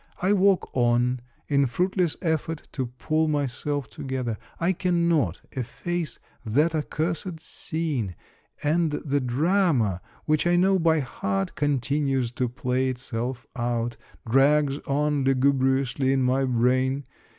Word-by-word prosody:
I 190 +3 +2
walk 195 -1 +3
on, 120 0 +2 0.3
in 140 -2 +3
fruitless 180 +4 0
effort 160 -1 -1
to 130 -3 -2
pull 155 +6 0
myself 145 -1 -1
together; 130 -5 -4 0.2
I 175 +3 +2
cannot 170 - +1
efface 160 +7 -3 0.3
that 145 +9 +2
accursed 160 +2 -2
scene, 150 - -3 0.5
and 155 +1 +2
the 145 -1 0
drama, 130 - +1 0.2
which 155 +2 +2
I 175 - +4
know 190 +2 +4
by 160 -2 +3
heart, 100 -6 -2
continues 140 -3 0
to 125 0 -1
play 130 0 0
itself 125 0 -4
out, 120 -1 -1 0.2
— - - -21
drags 140 +3 +3
on 145 0 +1
lugubriously 135 0 +2
in 135 -1 +2
my 130 +2 +2
brain. 130 +2 +1
140 Hz, 125 wpm, -25 LUFS, 125-160 Hz, 0.5 s, I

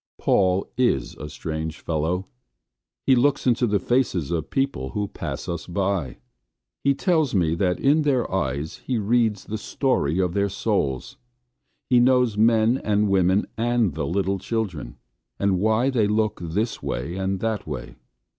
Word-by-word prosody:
Paul 95 0 +2
is 70 - +1
a 75 - -7
strange 80 +1 -5
fellow. 85 +4 -1 0.8
He 130 - +5
looks 140 +3 +2
into 120 -1 +3
the 105 -1 +2
faces 95 - 0
of 85 -2 -2
people 135 - -1
who 105 0 0
pass - - -5
us 85 -1 -4
by. 95 -7 -1 0.7
He 140 0 +3
tells 160 - +1
me 85 -4 +2
that 90 +1 0
in 145 +3 +3
their 135 -5 +1
eyes 70 -3 -2
he 125 - -3
reads 110 -1 +1
the 110 0 -4
story 100 - 0
of 90 -2 +1
their 100 +1 +1
souls. 65 -7 -2 0.7
He 125 -2 +4
knows 125 -3 +3
men 115 +3 +3
and 105 0 +1
women 95 +1 +3
and 120 -6 +1
the 70 -1 -3
little 95 +3 0
children, 95 - -4 0.4
and 100 -2 +1
why 110 +6 +2
they 115 -5 +2
look 110 0 0
this 100 +8 -2
way 65 +8 -3
and 95 0 -1
that 110 -5 -2
way. 65 -4 -6
100 Hz, 155 wpm, -24 LUFS, 85-120 Hz, 0.8 s, He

